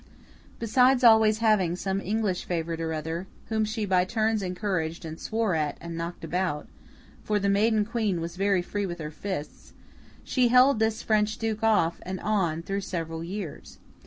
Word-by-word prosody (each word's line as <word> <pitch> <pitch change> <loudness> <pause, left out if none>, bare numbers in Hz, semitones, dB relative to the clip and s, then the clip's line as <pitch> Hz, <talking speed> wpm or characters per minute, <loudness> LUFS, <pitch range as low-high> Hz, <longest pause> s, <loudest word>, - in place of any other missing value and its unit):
Besides 250 +3 +3
always 220 -2 +6
having 190 -6 +3
some 195 +1 -2
English 205 -2 -1
favourite 165 -1 -2
or 165 0 -2
other 160 +3 -4 0.2
whom 220 -1 +1
she 215 0 -2
by 185 -2 +3
turns 220 +2 0
encouraged 180 -3 -2
and 160 0 -7
swore 220 -3 -1
at 150 -2 -1
and 170 -1 -7
knocked 170 +1 -5
about—for 180 +4 -4
the 200 -1 +1
maiden 210 +1 +3
Queen 215 -5 -1
was 170 +1 -5
very 195 -1 +1
free 205 +2 -3
with 175 -1 -5
her 155 -2 -6
fists—she 200 - -4
held 250 +1 +5
this 220 0 0
French 215 0 +1
Duke 220 -1 -2
off 210 -7 +2
and 185 +1 -5
on 175 -7 0
through 195 +3 -2
several 165 -3 -4
years. 185 -2 -7
195 Hz, 160 wpm, -27 LUFS, 170-220 Hz, 0.2 s, always